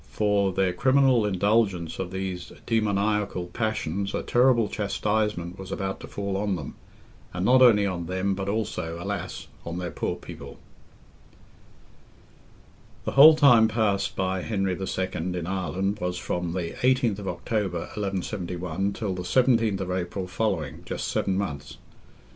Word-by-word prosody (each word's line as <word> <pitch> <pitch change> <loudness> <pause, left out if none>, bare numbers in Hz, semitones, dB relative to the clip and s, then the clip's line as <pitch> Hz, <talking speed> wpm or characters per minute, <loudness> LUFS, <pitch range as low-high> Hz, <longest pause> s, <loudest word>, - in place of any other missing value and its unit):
For 100 -2 +1
their 95 -1 +1
criminal 130 +1 +3
indulgence 100 -3 +1
of 95 -2 -3
these 95 -1 -5
demoniacal 105 -4 0
passions 100 -4 -2
a - - -2
terrible 120 -3 +3
chastisement 105 -4 -1
was 95 0 -8
about 95 0 -3
to - - -9
fall 100 -1 -4
on 100 -1 0
them, 75 -6 -6 0.6
and 90 +1 -1
not 130 +3 +5
only 110 -5 +6
on 90 -3 -3
them, 95 +2 0
but 95 0 -3
also, 100 -6 -2
alas! 90 0 -4 0.2
on 85 +1 -5
their 90 -1 -4
poor - - -2
people. 70 0 -10 2.5
The - - -1
whole 155 +3 +9
time 125 -7 +6
passed 105 -3 0
by 95 -1 -1
Henry 95 -2 -1
II. 95 0 -2
in 90 +1 -3
Ireland 95 +2 -2
was 90 -1 -2
from 90 -1 -3
the 90 -2 -3
18th 125 -5 +2
October, 95 -2 -2
1171, 95 -2 -3
till 105 -4 -3
the 90 - -4
17th 115 0 +2
of 90 -1 -3
April 90 +1 -3
following, 90 -6 -2
just - - -4
seven 95 -1 0
months. 75 -9 -4
95 Hz, 140 wpm, -26 LUFS, 90-110 Hz, 2.5 s, whole